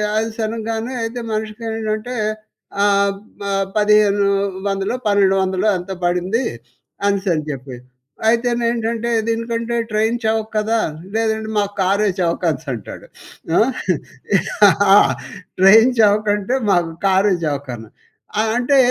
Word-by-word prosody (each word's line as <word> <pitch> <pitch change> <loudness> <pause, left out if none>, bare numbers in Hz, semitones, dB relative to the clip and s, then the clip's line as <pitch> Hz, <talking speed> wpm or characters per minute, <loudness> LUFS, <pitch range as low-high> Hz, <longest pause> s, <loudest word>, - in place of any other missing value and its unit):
Oils 220 +1 -2
అనంగానే 225 +2 -4
అయితే 230 +2 -4
మనిషికి 215 +1 -4
ఏమిటంటే 220 +2 -3 0.7
ఆహ్, 200 0 +3 0.3
మ - - -5 0.3
పదిహేను 210 -1 +4 0.4
వందలో, 195 +3 -1
పన్నెండు 200 -2 +3
వందలో 190 +2 0
ఎంతో 180 +2 -6
పడింది 180 +6 0 0.7
అనిసని 190 -6 0
చెప్పి. 135 -2 -6 0.5
అయితేనేంటంటే, 235 0 0 0.2
దీనికంటే 230 +1 -2 0.2
ట్రైన్ 220 +2 +1
చవక 220 0 0
కదా? 220 +2 +1 0.4
లేదండి 220 -1 -1
మాకు 205 -1 0
కారే 200 +3 +2
చవకనిసి 170 -3 -1
అంటాడు. 110 -5 -9 1.9
ఆ! - - +9 0.6
ట్రైన్ 220 +6 +7
చవకంటే? 210 +1 +2 0.2
మాకు 175 -3 +1 0.2
కారే 195 +1 +3
చవకని 130 -7 -4 0.5
ఆ! - - +4 0.2
అంటే 255 +3 +2
215 Hz, 105 wpm, -19 LUFS, 195-225 Hz, 1.9 s, ఆ